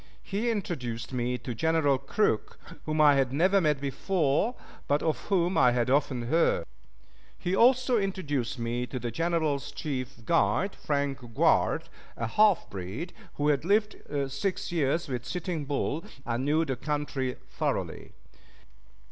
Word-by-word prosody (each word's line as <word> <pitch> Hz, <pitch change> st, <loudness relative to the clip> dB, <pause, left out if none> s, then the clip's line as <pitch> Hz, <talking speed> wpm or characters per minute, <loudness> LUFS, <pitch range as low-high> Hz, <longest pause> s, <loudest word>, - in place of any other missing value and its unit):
He 210 Hz, +4 st, -1 dB
introduced 130 Hz, -, -3 dB
me 125 Hz, 0 st, -1 dB
to 125 Hz, -, -5 dB
General 155 Hz, 0 st, +2 dB
Crook, 140 Hz, -, 0 dB, 0.3 s
whom 155 Hz, 0 st, 0 dB
I 150 Hz, -1 st, +7 dB
had 135 Hz, -2 st, +2 dB
never 185 Hz, +7 st, +3 dB
met 150 Hz, -4 st, +2 dB
before, 150 Hz, -, 0 dB, 0.3 s
but 145 Hz, +1 st, +1 dB
of 160 Hz, -2 st, +2 dB
whom 185 Hz, -2 st, +2 dB
I 125 Hz, -1 st, +5 dB
had 120 Hz, 0 st, +1 dB
often 135 Hz, -3 st, +1 dB
heard. 125 Hz, -, +2 dB, 0.7 s
He 180 Hz, +2 st, -1 dB
also 250 Hz, +1 st, +4 dB
introduced 145 Hz, -, -2 dB
me 120 Hz, +1 st, -2 dB
to 130 Hz, -, -5 dB
the 120 Hz, -1 st, -3 dB
General's 160 Hz, -1 st, 0 dB
chief 130 Hz, -5 st, -5 dB
guide, 180 Hz, +3 st, +2 dB
Frank 140 Hz, -2 st, -1 dB, 0.2 s
Grouard, -, -, +3 dB, 0.3 s
a 115 Hz, -, -2 dB
half 200 Hz, -, +3 dB
breed, 100 Hz, -, -6 dB, 0.2 s
who 145 Hz, +1 st, +1 dB
had 145 Hz, -1 st, +2 dB
lived 210 Hz, +4 st, +2 dB, 0.4 s
six 180 Hz, +8 st, -2 dB
years 165 Hz, 0 st, +1 dB
with 125 Hz, -3 st, -3 dB
Sitting 165 Hz, +2 st, -3 dB
Bull, 145 Hz, +3 st, -1 dB, 0.2 s
and 120 Hz, +2 st, -1 dB
knew 155 Hz, +3 st, +2 dB
the 135 Hz, -, -2 dB
country 145 Hz, -2 st, -2 dB, 0.2 s
thoroughly. -, -, -3 dB
145 Hz, 145 wpm, -28 LUFS, 130-175 Hz, 0.7 s, I